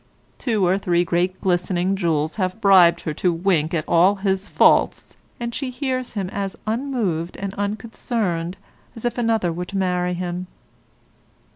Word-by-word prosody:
Two 220 Hz, -6 st, +1 dB
or 185 Hz, +2 st, +2 dB
three 175 Hz, -2 st, +1 dB
great 180 Hz, +2 st, 0 dB
glistening 180 Hz, +1 st, +1 dB
jewels 160 Hz, -4 st, 0 dB
have 185 Hz, +1 st, -1 dB
bribed 180 Hz, -5 st, +6 dB
her 155 Hz, -, -3 dB
to 180 Hz, +4 st, +1 dB
wink 165 Hz, -2 st, +1 dB
at 155 Hz, -, -2 dB
all 180 Hz, +4 st, +4 dB
his 195 Hz, 0 st, -1 dB
faults, -, -, +3 dB, 0.2 s
and 235 Hz, 0 st, -4 dB
she 270 Hz, 0 st, -3 dB
hears 255 Hz, -1 st, -3 dB
him 200 Hz, -4 st, -2 dB
as 195 Hz, -1 st, -3 dB
unmoved 215 Hz, -, -2 dB
and 195 Hz, 0 st, -4 dB
unconcerned 200 Hz, -4 st, -3 dB, 0.4 s
as 230 Hz, -, -8 dB
if 240 Hz, 0 st, -1 dB
another 225 Hz, -7 st, +1 dB
were 175 Hz, +2 st, -4 dB
to 195 Hz, +2 st, -5 dB
marry 180 Hz, -1 st, 0 dB
him. 180 Hz, +1 st, -4 dB
190 Hz, 155 wpm, -22 LUFS, 175-215 Hz, 0.4 s, bribed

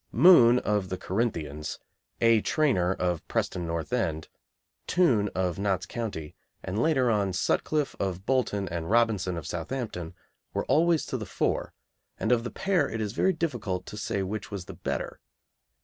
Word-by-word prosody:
Moon, 125 Hz, -, +7 dB
of 105 Hz, -5 st, 0 dB
the 95 Hz, -, -3 dB
Corinthians; 80 Hz, -9 st, -2 dB, 0.4 s
A. 115 Hz, -2 st, +5 dB
Trainor, 130 Hz, -, +2 dB
of 90 Hz, -3 st, -2 dB
Preston 85 Hz, -2 st, -1 dB
North 85 Hz, +6 st, -3 dB
End; 80 Hz, -10 st, -1 dB, 0.6 s
Toone, 120 Hz, -, +3 dB
of 90 Hz, 0 st, -1 dB
Notts 95 Hz, -2 st, 0 dB
County; 100 Hz, -10 st, -5 dB, 0.3 s
and, 95 Hz, +4 st, -2 dB
later 130 Hz, -6 st, +3 dB
on, 100 Hz, -3 st, +1 dB
Sutcliffe, 145 Hz, +9 st, 0 dB
of 95 Hz, -1 st, -2 dB
Bolton, 110 Hz, -6 st, 0 dB
and 85 Hz, -1 st, -4 dB
Robinson, 105 Hz, -6 st, +2 dB
of 80 Hz, -, -6 dB
Southampton, 90 Hz, -, -4 dB, 0.4 s
were -, -, 0 dB
always 165 Hz, 0 st, +3 dB
to -, -, -3 dB
the -, -, -6 dB
fore, -, -, -1 dB, 0.4 s
and 110 Hz, -, 0 dB
of 120 Hz, -2 st, +3 dB
the 120 Hz, -, -3 dB
pair 190 Hz, -7 st, +1 dB
it 115 Hz, -, -4 dB
is 105 Hz, -1 st, -2 dB
very 190 Hz, +9 st, +2 dB
difficult 120 Hz, -, -2 dB
to -, -, -8 dB
say 100 Hz, -2 st, -2 dB
which 100 Hz, +1 st, -4 dB
was 100 Hz, -4 st, -5 dB
the -, -, -8 dB
better. -, -, -4 dB
105 Hz, 165 wpm, -28 LUFS, 90-125 Hz, 0.6 s, Moon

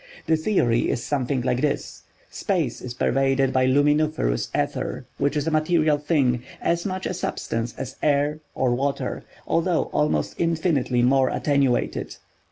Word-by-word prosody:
The 160 Hz, -, +3 dB
theory 155 Hz, -, +1 dB
is 120 Hz, -, -1 dB
something 135 Hz, -2 st, -1 dB
like 125 Hz, 0 st, 0 dB
this: 150 Hz, -2 st, -2 dB, 0.3 s
Space 165 Hz, -, -1 dB
is 125 Hz, -1 st, -6 dB
pervaded 135 Hz, +1 st, +1 dB
by 130 Hz, -1 st, +3 dB
luminiferous 145 Hz, -, +2 dB
ether, -, -, -2 dB
which 140 Hz, +2 st, +1 dB
is 145 Hz, -, -1 dB
a 165 Hz, -, 0 dB
material 155 Hz, -1 st, +2 dB
thing—as 145 Hz, -, 0 dB
much 190 Hz, 0 st, -4 dB
a -, -, -1 dB
substance 115 Hz, -9 st, -3 dB
as 130 Hz, 0 st, -6 dB
air 145 Hz, +1 st, +1 dB, 0.2 s
or 125 Hz, -2 st, +1 dB
water, 140 Hz, +3 st, -2 dB, 0.2 s
though 165 Hz, 0 st, +1 dB
almost 150 Hz, 0 st, +1 dB
infinitely 160 Hz, -7 st, +1 dB
more 130 Hz, +1 st, +4 dB
attenuated. 140 Hz, -4 st, 0 dB
140 Hz, 140 wpm, -24 LUFS, 130-155 Hz, 0.3 s, more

